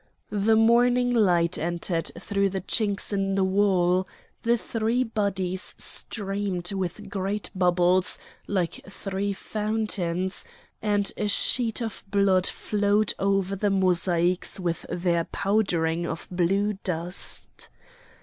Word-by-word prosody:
The 210 Hz, +2 st, +3 dB
morning 245 Hz, +2 st, +4 dB
light 180 Hz, -6 st, +3 dB
entered 170 Hz, 0 st, -1 dB
through 200 Hz, +1 st, 0 dB
the 190 Hz, 0 st, -3 dB
chinks 205 Hz, 0 st, 0 dB
in 195 Hz, -1 st, 0 dB
the 195 Hz, -, +2 dB
wall; 185 Hz, -2 st, +2 dB, 0.3 s
the 235 Hz, +1 st, +2 dB
three 230 Hz, +2 st, 0 dB
bodies 195 Hz, -5 st, -1 dB
streamed 195 Hz, -4 st, -1 dB
with 195 Hz, +1 st, -4 dB
great 200 Hz, +1 st, -3 dB
bubbles 180 Hz, 0 st, +2 dB, 0.3 s
like 180 Hz, -4 st, -1 dB
three 195 Hz, 0 st, -3 dB
fountains, 195 Hz, -4 st, -2 dB, 0.4 s
and 205 Hz, -2 st, +1 dB
a 210 Hz, -, 0 dB
sheet 230 Hz, +3 st, +1 dB
of 225 Hz, -3 st, -6 dB
blood 195 Hz, -2 st, +3 dB
flowed 205 Hz, 0 st, +1 dB
over 195 Hz, 0 st, +1 dB
the 205 Hz, +1 st, 0 dB
mosaics 180 Hz, -2 st, +1 dB
with 175 Hz, -2 st, -3 dB
their 170 Hz, -2 st, 0 dB
powdering 175 Hz, -5 st, 0 dB
of 165 Hz, -, -5 dB
blue 195 Hz, +3 st, +1 dB
dust. 175 Hz, 0 st, -1 dB
195 Hz, 115 wpm, -26 LUFS, 180-210 Hz, 0.4 s, morning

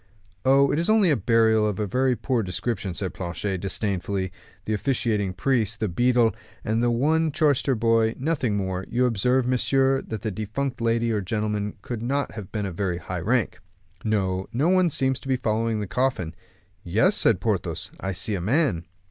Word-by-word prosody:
"Oh, 135 Hz, +1 st, +5 dB
it 150 Hz, -, +1 dB
is 170 Hz, -, +1 dB
only 215 Hz, -6 st, +4 dB
a -, -, +4 dB
burial 110 Hz, 0 st, +3 dB
of 105 Hz, -1 st, -3 dB
a 105 Hz, -, 0 dB
very 130 Hz, +5 st, +1 dB
poor 120 Hz, +2 st, 0 dB
description," 95 Hz, 0 st, -3 dB
said 95 Hz, -3 st, -3 dB
Planchet, 95 Hz, +1 st, -3 dB
disdainfully; 95 Hz, 0 st, -2 dB, 0.3 s
"the 110 Hz, -, -1 dB
officiating 110 Hz, -4 st, 0 dB
priest, 110 Hz, 0 st, 0 dB
the 110 Hz, -, 0 dB
beadle, 120 Hz, +4 st, +2 dB, 0.3 s
and 110 Hz, +2 st, 0 dB
only 120 Hz, -1 st, +2 dB
one 160 Hz, +4 st, +2 dB
chorister 145 Hz, -3 st, +2 dB
boy, 115 Hz, 0 st, +2 dB
nothing 135 Hz, -7 st, 0 dB
more. 95 Hz, -1 st, -2 dB
You 125 Hz, +2 st, +2 dB
observe, 125 Hz, +2 st, +2 dB
messieurs, 135 Hz, +2 st, +2 dB
that 110 Hz, -3 st, -5 dB
the 110 Hz, -, -1 dB
defunct 115 Hz, +6 st, -3 dB
lady 115 Hz, 0 st, +1 dB
or 105 Hz, -2 st, 0 dB
gentleman 105 Hz, +1 st, -2 dB
could 120 Hz, -3 st, -5 dB
not 140 Hz, +3 st, -1 dB
have 105 Hz, -4 st, -8 dB
been 105 Hz, -2 st, -2 dB
of 95 Hz, -, -4 dB
very 90 Hz, -1 st, -1 dB
high 90 Hz, 0 st, -5 dB
rank." 110 Hz, 0 st, 0 dB, 0.4 s
"No; 95 Hz, -4 st, 0 dB
no 140 Hz, +8 st, +1 dB
one 185 Hz, -1 st, +4 dB
seems 130 Hz, -3 st, +1 dB
to -, -, -12 dB
be 130 Hz, -, +2 dB
following 115 Hz, -2 st, -1 dB
the -, -, -2 dB
coffin." 125 Hz, -9 st, -1 dB, 0.5 s
"Yes," 110 Hz, -, +2 dB
said 110 Hz, -, +3 dB
Porthos; 100 Hz, -1 st, -2 dB
"I 95 Hz, -, -3 dB
see 95 Hz, +4 st, -2 dB
a 95 Hz, -, -2 dB
man." 110 Hz, -, +1 dB
115 Hz, 185 wpm, -25 LUFS, 100-130 Hz, 0.5 s, Oh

